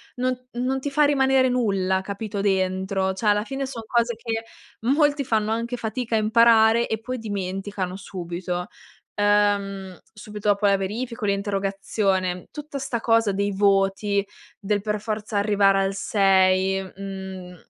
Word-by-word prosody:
non 255 Hz, 0 st, -2 dB
non 255 Hz, +2 st, -1 dB
ti 285 Hz, +2 st, -3 dB
fa 300 Hz, +2 st, +3 dB
rimanere 265 Hz, -2 st, +3 dB
nulla, 195 Hz, -6 st, +1 dB
capito, 200 Hz, +1 st, -4 dB
dentro; 190 Hz, 0 st, 0 dB
cioè 190 Hz, +4 st, -6 dB
alla 210 Hz, 0 st, +3 dB
fine 270 Hz, +3 st, -4 dB
son 245 Hz, -4 st, -7 dB
cose 235 Hz, 0 st, +1 dB
che 225 Hz, 0 st, -4 dB, 0.4 s
molti 285 Hz, +4 st, +2 dB
fanno 220 Hz, -2 st, 0 dB
anche 235 Hz, +2 st, -2 dB
fatica 230 Hz, +1 st, -3 dB
a 220 Hz, -, +3 dB
imparare 225 Hz, +1 st, +5 dB
e 220 Hz, -, -2 dB
poi 255 Hz, +3 st, -5 dB
dimenticano 195 Hz, -2 st, -4 dB
subito 180 Hz, -1 st, -5 dB, 0.5 s
ehm, 200 Hz, -2 st, +1 dB
subito 210 Hz, -1 st, -7 dB
dopo 205 Hz, +1 st, +2 dB
la 200 Hz, -, +4 dB
verifica 230 Hz, +5 st, -4 dB
o -, -, +1 dB
l'interrogazione. 195 Hz, -2 st, -1 dB
Tutta 295 Hz, -1 st, -6 dB
sta 260 Hz, -3 st, -2 dB
cosa 225 Hz, -2 st, +3 dB
dei 200 Hz, +1 st, -1 dB
voti, 200 Hz, 0 st, +2 dB, 0.3 s
del 205 Hz, 0 st, -1 dB
per 210 Hz, 0 st, -2 dB
forza 215 Hz, -1 st, -3 dB
arrivare 200 Hz, -1 st, +3 dB
al 195 Hz, -, -1 dB
6, 190 Hz, -1 st, +3 dB
mhmm, 190 Hz, -1 st, -8 dB
205 Hz, 145 wpm, -24 LUFS, 195-230 Hz, 0.5 s, imparare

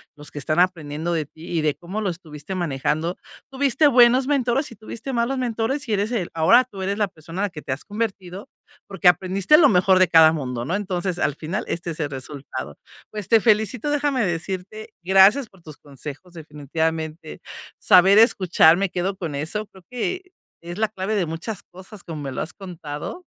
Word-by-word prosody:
los 150 Hz, 0 st, -10 dB
que -, -, -12 dB
están 155 Hz, +4 st, -1 dB
aprendiendo 165 Hz, -2 st, 0 dB
de 160 Hz, -2 st, -1 dB
ti 160 Hz, +4 st, -14 dB
y -, -, +1 dB
de 150 Hz, -2 st, 0 dB
cómo 190 Hz, +5 st, -6 dB
lo 200 Hz, -, -1 dB
estuviste 160 Hz, -1 st, -8 dB
manejando. 160 Hz, 0 st, -2 dB, 0.3 s
Tuviste 280 Hz, +2 st, +3 dB
buenos 250 Hz, 0 st, +5 dB
mentores 275 Hz, -1 st, 0 dB
y -, -, -11 dB
tuviste 225 Hz, +5 st, -7 dB
malos 240 Hz, +3 st, 0 dB
mentores, 245 Hz, +3 st, -2 dB
y 220 Hz, -, -1 dB
eres 205 Hz, +3 st, 0 dB
el 200 Hz, -8 st, -2 dB
ahora 165 Hz, +10 st, +5 dB
tú 200 Hz, -6 st, -10 dB
eres 200 Hz, +2 st, -2 dB
la 210 Hz, -2 st, +1 dB
persona 165 Hz, +2 st, -8 dB
la 205 Hz, -, 0 dB
que 150 Hz, -3 st, -9 dB
te 130 Hz, -, -5 dB
has 135 Hz, -, -4 dB
convertido, 200 Hz, -3 st, -5 dB, 0.4 s
porque 190 Hz, -3 st, 0 dB
aprendiste 190 Hz, +9 st, +4 dB
lo 300 Hz, -4 st, +6 dB
mejor 185 Hz, -1 st, +4 dB
de 185 Hz, -, +5 dB
cada 160 Hz, -1 st, +7 dB
mundo, 125 Hz, -6 st, -4 dB
¿no? 170 Hz, -, -1 dB
Entonces, 185 Hz, -3 st, -2 dB
al 150 Hz, -4 st, 0 dB
final 170 Hz, +8 st, -4 dB
este 170 Hz, 0 st, -4 dB
es 160 Hz, -, -8 dB
el 145 Hz, -, -2 dB
resultado. 130 Hz, -, -7 dB, 0.3 s
Pues, 210 Hz, -3 st, -6 dB
te 225 Hz, -, +5 dB
felicito. 220 Hz, +4 st, +1 dB
Déjame 285 Hz, -5 st, 0 dB
decirte, 185 Hz, +5 st, -5 dB
gracias 195 Hz, +8 st, +5 dB
por 190 Hz, -3 st, -22 dB
tus 155 Hz, -3 st, -12 dB
consejos, 145 Hz, +5 st, -10 dB
definitivamente. 160 Hz, +1 st, -4 dB, 0.4 s
Saber 190 Hz, +3 st, +6 dB
escuchar, 180 Hz, -7 st, +5 dB
me 195 Hz, 0 st, 0 dB
quedo 185 Hz, +2 st, -2 dB
con 165 Hz, -6 st, -5 dB
eso, 160 Hz, +10 st, -3 dB
creo 190 Hz, -2 st, -18 dB
que 250 Hz, +10 st, -3 dB, 0.4 s
es 175 Hz, +1 st, -8 dB
la 220 Hz, 0 st, +1 dB
clave 200 Hz, +1 st, -3 dB
de 195 Hz, -4 st, +1 dB
muchas 170 Hz, +5 st, -6 dB
cosas, 190 Hz, +2 st, -13 dB
como 155 Hz, -3 st, -7 dB
me 135 Hz, -, -5 dB
lo -, -, -4 dB
has 155 Hz, -, -5 dB
contado, 180 Hz, -, -8 dB
185 Hz, 195 wpm, -22 LUFS, 160-215 Hz, 0.4 s, cada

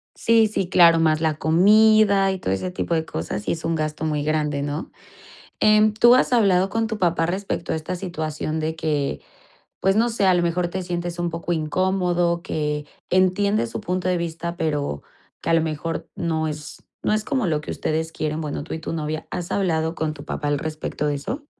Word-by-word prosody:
Sí, 225 Hz, -1 st, +4 dB
sí, 195 Hz, -4 st, -2 dB
claro, 170 Hz, -3 st, +6 dB
más 155 Hz, -1 st, +2 dB
la 155 Hz, -2 st, +1 dB
comida 200 Hz, +3 st, +5 dB
y 190 Hz, -, -4 dB
todo 95 Hz, -, -2 dB
ese 180 Hz, -, -3 dB
tipo 175 Hz, -, -2 dB
de 160 Hz, 0 st, -1 dB
cosas, 85 Hz, -, -4 dB
sí -, -, -1 dB
es 165 Hz, -, -4 dB
un 165 Hz, 0 st, 0 dB
gasto 155 Hz, 0 st, -3 dB
muy 150 Hz, -2 st, -1 dB
grande, 150 Hz, -2 st, 0 dB
¿no? 145 Hz, +2 st, -4 dB, 0.7 s
Em, 215 Hz, 0 st, +5 dB
¿tú 240 Hz, +3 st, +6 dB
has 255 Hz, 0 st, +3 dB
hablado 195 Hz, -4 st, +3 dB
con 225 Hz, +1 st, 0 dB
tu 220 Hz, -1 st, -4 dB
papá 170 Hz, -2 st, +2 dB
respecto 185 Hz, 0 st, -3 dB
a -, -, 0 dB
esta 160 Hz, +3 st, -4 dB
situación 160 Hz, -3 st, -4 dB
de 160 Hz, +1 st, -2 dB
que, 150 Hz, -4 st, -1 dB, 0.6 s
pues, 195 Hz, +1 st, +2 dB
no 235 Hz, +2 st, +3 dB
sé, 220 Hz, -4 st, 0 dB
a 185 Hz, -, +5 dB
lo 175 Hz, -1 st, +2 dB
mejor, 175 Hz, +1 st, 0 dB
te 185 Hz, +2 st, -4 dB
sientes 175 Hz, -1 st, -4 dB
un 175 Hz, 0 st, -1 dB
poco 170 Hz, +1 st, -3 dB
incómodo, 175 Hz, +1 st, 0 dB
que 150 Hz, -4 st, -2 dB, 0.2 s
entiendes 185 Hz, -, +2 dB
su -, -, -5 dB
punto 185 Hz, +1 st, -2 dB
de 180 Hz, -, +1 dB
vista, 170 Hz, 0 st, -4 dB
pero 145 Hz, -, -2 dB, 0.4 s
que, -, -, -3 dB
a -, -, +3 dB
lo 165 Hz, -, +4 dB
mejor, 160 Hz, +1 st, -4 dB
no 160 Hz, -2 st, -1 dB
es 150 Hz, -1 st, -7 dB, 0.2 s
no -, -, +1 dB
es 215 Hz, 0 st, 0 dB
como 260 Hz, -6 st, -1 dB
lo 155 Hz, -3 st, 0 dB
que -, -, -6 dB
ustedes 160 Hz, +1 st, -2 dB
quieren? 155 Hz, 0 st, -3 dB
Bueno, 150 Hz, -1 st, -4 dB
tú -, -, -6 dB
y 160 Hz, -, -4 dB
tu 160 Hz, -, -5 dB
novia, 155 Hz, -1 st, -3 dB
¿has 175 Hz, -1 st, -4 dB
hablado 165 Hz, -4 st, 0 dB
con 155 Hz, -1 st, -2 dB
tu 145 Hz, -2 st, -11 dB
papá 145 Hz, -1 st, -3 dB
al 145 Hz, -1 st, 0 dB
respecto 155 Hz, -1 st, -3 dB
de 145 Hz, -, 0 dB
eso? 265 Hz, -, -5 dB
165 Hz, 215 wpm, -23 LUFS, 155-185 Hz, 0.7 s, claro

